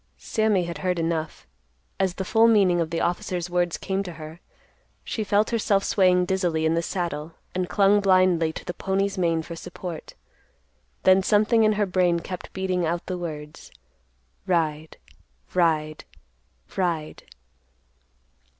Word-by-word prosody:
Sammy 215 Hz, -4 st, +1 dB
had 170 Hz, -3 st, -5 dB
heard 180 Hz, +2 st, -1 dB
enough. 165 Hz, -, -2 dB, 0.5 s
As 190 Hz, -2 st, +1 dB
the 190 Hz, -, -4 dB
full 225 Hz, +4 st, +4 dB
meaning 195 Hz, -6 st, +4 dB
of 160 Hz, -, -2 dB
the 165 Hz, 0 st, -2 dB
officers' 175 Hz, 0 st, -2 dB
words 175 Hz, -1 st, 0 dB
came 195 Hz, 0 st, -2 dB
to 180 Hz, -3 st, -6 dB
her, 155 Hz, +1 st, -10 dB, 0.6 s
she 220 Hz, -, -3 dB
felt 205 Hz, +2 st, +1 dB
herself 205 Hz, -4 st, +1 dB
swaying 180 Hz, -2 st, +3 dB
dizzily 175 Hz, -4 st, 0 dB
in 160 Hz, -, +2 dB
the 165 Hz, -, +1 dB
saddle 170 Hz, -3 st, -4 dB, 0.2 s
and 180 Hz, -1 st, -2 dB
clung 205 Hz, 0 st, +4 dB
blindly 185 Hz, -4 st, +3 dB
to -, -, -9 dB
the 175 Hz, -, -4 dB
pony's 195 Hz, +1 st, -1 dB
mane 165 Hz, -2 st, +1 dB
for 170 Hz, -, -8 dB
support. 165 Hz, 0 st, -8 dB, 0.9 s
Then 190 Hz, 0 st, +6 dB
something 215 Hz, +3 st, +3 dB
in 215 Hz, 0 st, +4 dB
her 210 Hz, 0 st, +1 dB
brain 180 Hz, -2 st, +2 dB
kept 180 Hz, +2 st, -7 dB
beating 185 Hz, -2 st, -1 dB
out 170 Hz, +1 st, -1 dB
the 185 Hz, -, -3 dB
words, 150 Hz, -3 st, -7 dB, 0.8 s
"Ride, 160 Hz, -3 st, -1 dB, 0.6 s
Ride, 155 Hz, -4 st, +1 dB, 0.7 s
Ride." 170 Hz, -5 st, -2 dB
180 Hz, 145 wpm, -24 LUFS, 165-195 Hz, 0.9 s, Then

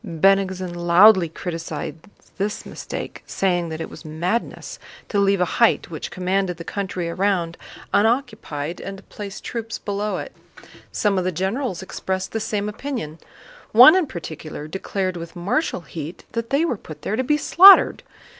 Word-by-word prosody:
Bennigsen 185 Hz, +1 st, +1 dB
loudly 175 Hz, +2 st, +5 dB
criticized 165 Hz, -2 st, -5 dB, 0.4 s
this 205 Hz, +2 st, -2 dB
mistake, -, -, -7 dB
saying 175 Hz, -3 st, 0 dB
that 160 Hz, 0 st, -5 dB
it -, -, -4 dB
was -, -, -12 dB
madness 175 Hz, +8 st, -3 dB, 0.3 s
to 205 Hz, -, +1 dB
leave 200 Hz, -1 st, +3 dB
a 180 Hz, -, +3 dB, 0.2 s
height 235 Hz, -, +3 dB
which 155 Hz, -, -5 dB
commanded 185 Hz, -1 st, -1 dB
the 170 Hz, -, -7 dB
country 185 Hz, -2 st, -4 dB
around 175 Hz, -1 st, 0 dB, 0.4 s
unoccupied 210 Hz, -, 0 dB
and 195 Hz, 0 st, -6 dB
to 195 Hz, -, -15 dB
place 200 Hz, -1 st, -8 dB
troops 230 Hz, -1 st, -5 dB
below 205 Hz, +1 st, -3 dB
it. -, -, -7 dB, 0.6 s
Some 200 Hz, -3 st, +1 dB
of -, -, -1 dB
the 185 Hz, -, 0 dB
generals 190 Hz, -, -2 dB
expressed 190 Hz, 0 st, -4 dB
the 225 Hz, -, -2 dB
same 210 Hz, -1 st, -2 dB
opinion. 210 Hz, -, -5 dB, 0.5 s
One 250 Hz, +9 st, +10 dB
in 370 Hz, -5 st, +2 dB
particular 155 Hz, -, -7 dB
declared 185 Hz, +1 st, -3 dB
with 170 Hz, 0 st, -8 dB
martial 185 Hz, -, -1 dB
heat 165 Hz, 0 st, -8 dB
that 230 Hz, 0 st, -3 dB
they 280 Hz, +5 st, +2 dB
were 250 Hz, -9 st, -1 dB
put 155 Hz, -5 st, -12 dB
there 210 Hz, -, -1 dB
to 260 Hz, -, 0 dB
be 295 Hz, +3 st, +2 dB
slaughtered. 380 Hz, +5 st, +7 dB
190 Hz, 160 wpm, -22 LUFS, 170-215 Hz, 0.6 s, One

